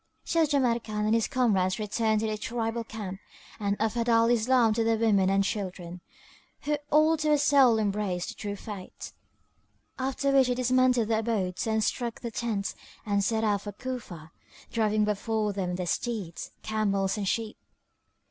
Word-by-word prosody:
So 330 Hz, -2 st, +2 dB
Jamrkan 235 Hz, -7 st, 0 dB
and 215 Hz, -, +2 dB
his 230 Hz, -1 st, +2 dB
comrades 195 Hz, -7 st, +1 dB
returned 215 Hz, 0 st, 0 dB
to -, -, -1 dB
their 215 Hz, -1 st, -1 dB
tribal 230 Hz, +1 st, -3 dB
camp 205 Hz, -4 st, -7 dB, 0.4 s
and 200 Hz, -1 st, -1 dB
offered 230 Hz, +2 st, 0 dB
Al 230 Hz, 0 st, +4 dB
Islam 240 Hz, -1 st, +3 dB
to 225 Hz, +1 st, +1 dB
their 225 Hz, 0 st, +2 dB
women 205 Hz, -4 st, +3 dB
and 195 Hz, 0 st, +3 dB
children, 180 Hz, -4 st, -4 dB, 0.6 s
who 300 Hz, 0 st, 0 dB
all 310 Hz, +2 st, +4 dB
to 305 Hz, 0 st, 0 dB
a 300 Hz, -, +5 dB
soul 275 Hz, -5 st, +5 dB
embraced 200 Hz, -4 st, -1 dB
the -, -, -6 dB
True 205 Hz, -1 st, -5 dB
Faith, 200 Hz, -2 st, -9 dB, 0.9 s
after 270 Hz, +1 st, 0 dB
which 270 Hz, -2 st, +5 dB
they 250 Hz, -, 0 dB
dismantled 250 Hz, -2 st, +2 dB
their 220 Hz, -1 st, +2 dB
abodes 215 Hz, -4 st, -1 dB
and 220 Hz, 0 st, +1 dB
struck 235 Hz, +1 st, -2 dB
their 235 Hz, -, -5 dB
tents 215 Hz, -3 st, -2 dB, 0.3 s
and 200 Hz, -1 st, +1 dB
set 220 Hz, +2 st, 0 dB
out 205 Hz, -3 st, +1 dB
for 205 Hz, 0 st, -7 dB
Cufa, 200 Hz, -10 st, -7 dB, 0.4 s
driving 215 Hz, -2 st, +1 dB
before 210 Hz, 0 st, -1 dB
them 180 Hz, -2 st, -2 dB
their 180 Hz, 0 st, -3 dB
steeds, 195 Hz, -2 st, -3 dB
camels 200 Hz, -3 st, 0 dB
and 205 Hz, -2 st, -3 dB
sheep. 220 Hz, +2 st, -2 dB
220 Hz, 165 wpm, -28 LUFS, 200-240 Hz, 0.9 s, a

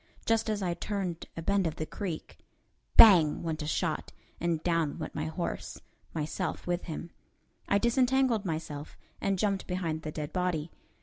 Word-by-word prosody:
Just 225 Hz, -1 st, +2 dB
as 210 Hz, -2 st, -1 dB
I 175 Hz, -2 st, 0 dB
turned 185 Hz, -3 st, -3 dB
a 165 Hz, -, -4 dB
bend 200 Hz, 0 st, +2 dB
of 155 Hz, -, -3 dB
the 155 Hz, -, -3 dB
creek, 175 Hz, -2 st, -6 dB, 0.6 s
"bang!" 175 Hz, -9 st, +8 dB
went 160 Hz, -1 st, -2 dB
a 150 Hz, -, -3 dB
shot, -, -, -1 dB, 0.3 s
and 170 Hz, -2 st, 0 dB
down 165 Hz, -4 st, +1 dB
went -, -, -5 dB
my 155 Hz, 0 st, -2 dB
horse 160 Hz, +2 st, -4 dB, 0.4 s
myself 160 Hz, +4 st, -2 dB
with 175 Hz, 0 st, -1 dB
him. 165 Hz, 0 st, -6 dB, 0.6 s
I 200 Hz, -, +5 dB
disentangled 245 Hz, 0 st, +3 dB
myself, 155 Hz, -4 st, -5 dB, 0.2 s
and 195 Hz, -1 st, +1 dB
jumped 195 Hz, 0 st, 0 dB
behind 170 Hz, -4 st, -2 dB
the 155 Hz, -, -5 dB
dead 150 Hz, -1 st, -5 dB
body. 175 Hz, -4 st, -1 dB
175 Hz, 165 wpm, -30 LUFS, 160-200 Hz, 0.6 s, bang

